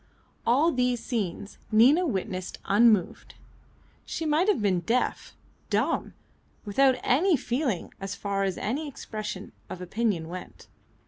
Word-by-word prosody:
All 285 Hz, +8 st, +4 dB
these 250 Hz, -2 st, +1 dB
scenes 205 Hz, -4 st, -4 dB
Nina 270 Hz, +11 st, +5 dB
witnessed 190 Hz, -, -3 dB
unmoved. 210 Hz, -2 st, +3 dB, 0.7 s
She 325 Hz, -, -4 dB
might 310 Hz, +5 st, +2 dB
have 420 Hz, -, +3 dB
been 195 Hz, -4 st, +2 dB
deaf, 230 Hz, +9 st, -1 dB, 0.3 s
dumb, -, -, 0 dB, 0.5 s
without 260 Hz, +6 st, +4 dB
any 330 Hz, +6 st, +3 dB
feeling 245 Hz, -, -2 dB
as 195 Hz, 0 st, -4 dB
far 200 Hz, -1 st, -2 dB
as 190 Hz, -2 st, -1 dB
any 280 Hz, +9 st, -2 dB
expression 210 Hz, -7 st, -6 dB, 0.2 s
of 185 Hz, -, -6 dB
opinion 180 Hz, -2 st, -1 dB
went. 180 Hz, +2 st, -9 dB
220 Hz, 125 wpm, -27 LUFS, 195-265 Hz, 0.7 s, Nina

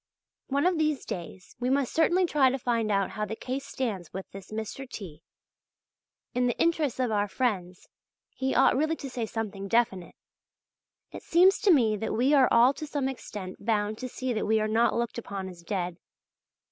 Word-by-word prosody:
One 280 Hz, +2 st, +1 dB
of 360 Hz, -3 st, +2 dB
these 305 Hz, -3 st, 0 dB
days 185 Hz, +1 st, -7 dB
we 250 Hz, 0 st, 0 dB
must 270 Hz, -1 st, +1 dB
certainly 345 Hz, +3 st, +3 dB
try 290 Hz, -6 st, +4 dB
to 265 Hz, -, -1 dB
find 230 Hz, -4 st, 0 dB
out 195 Hz, -1 st, +1 dB
how 215 Hz, -, -3 dB
the 210 Hz, +1 st, -3 dB
case 265 Hz, +4 st, -5 dB
stands 215 Hz, -, -3 dB
with 190 Hz, 0 st, -6 dB
this 195 Hz, -1 st, -10 dB
Mr. 220 Hz, +5 st, -5 dB
T. 165 Hz, -10 st, -8 dB, 1.1 s
In 250 Hz, 0 st, +2 dB
the 240 Hz, -, -1 dB
interests 320 Hz, -6 st, +1 dB
of 250 Hz, -3 st, +1 dB
our 205 Hz, -1 st, +1 dB
friends 190 Hz, -6 st, -2 dB, 0.4 s
he 265 Hz, 0 st, -2 dB
ought -, -, +5 dB
really 310 Hz, +4 st, +1 dB
to 275 Hz, -, -7 dB
say 235 Hz, -3 st, -3 dB
something 205 Hz, -3 st, -4 dB
definite. 195 Hz, -5 st, 0 dB, 1.0 s
It -, -, -8 dB
seems 370 Hz, +3 st, +4 dB
to 415 Hz, -, +4 dB
me 225 Hz, -9 st, +4 dB
that 220 Hz, -, -3 dB
we 255 Hz, +6 st, +3 dB
are 270 Hz, -3 st, +6 dB
all 240 Hz, +3 st, +5 dB
to 305 Hz, -, -7 dB
some 285 Hz, -2 st, -1 dB
extent 205 Hz, -8 st, -7 dB
bound 215 Hz, -1 st, 0 dB
to 255 Hz, -, -5 dB
see 255 Hz, 0 st, -3 dB
that 215 Hz, -, -2 dB
we 220 Hz, 0 st, +3 dB
are 215 Hz, -, 0 dB
not 230 Hz, +2 st, +2 dB
looked 235 Hz, 0 st, -2 dB
upon 200 Hz, -4 st, -5 dB
as 180 Hz, -2 st, -10 dB
dead. 175 Hz, -1 st, -3 dB
235 Hz, 195 wpm, -28 LUFS, 205-270 Hz, 1.1 s, are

